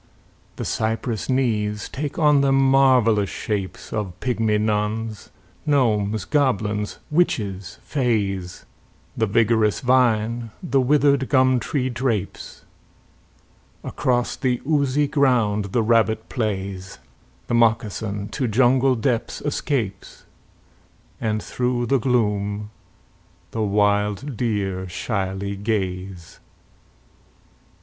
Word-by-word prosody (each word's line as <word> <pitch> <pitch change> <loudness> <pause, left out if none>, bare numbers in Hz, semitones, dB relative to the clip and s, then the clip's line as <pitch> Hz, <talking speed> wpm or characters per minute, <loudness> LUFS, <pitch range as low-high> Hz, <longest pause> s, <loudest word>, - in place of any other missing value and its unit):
The - - -5
cypress 110 0 -2
knees 105 -5 0
take 145 +1 -5
on 150 -3 +4
them 135 -1 +3
marvellous 130 -6 +4
shapes 100 -4 -4
Of 100 -5 -4
pygmy 110 -4 0
nuns, 105 0 -2 0.3
gnomes, 110 -8 +1
goblins, 110 -8 0
witches, 100 - 0
fays, 100 -9 -2 0.5
The 110 - +1
vigorous 110 0 +2
vine 120 -2 +2
the 140 -6 +2
withered 140 0 +3
gum 130 -2 +4
tree 130 +3 -1
drapes, 115 -5 -3 1.2
Across 125 -1 -1
the 125 -2 0
oozy 145 -2 +2
ground 120 -8 +2
the 105 +4 0
rabbit 110 -1 +2
plays, 95 -4 -3 0.5
The - - -4
moccasin 110 -3 +1
to 130 -4 -2
jungle 130 +3 +3
depths 115 0 -1
escapes, 125 - -3 0.9
And 110 -1 -1
through 125 -1 -1
the 135 +2 +2
gloom 105 -4 0 0.8
the 115 - -3
wild 105 +5 +1
deer 100 -5 -2
shyly 95 +1 -3
gaze. 95 -4 -4
110 Hz, 95 wpm, -22 LUFS, 105-130 Hz, 1.2 s, on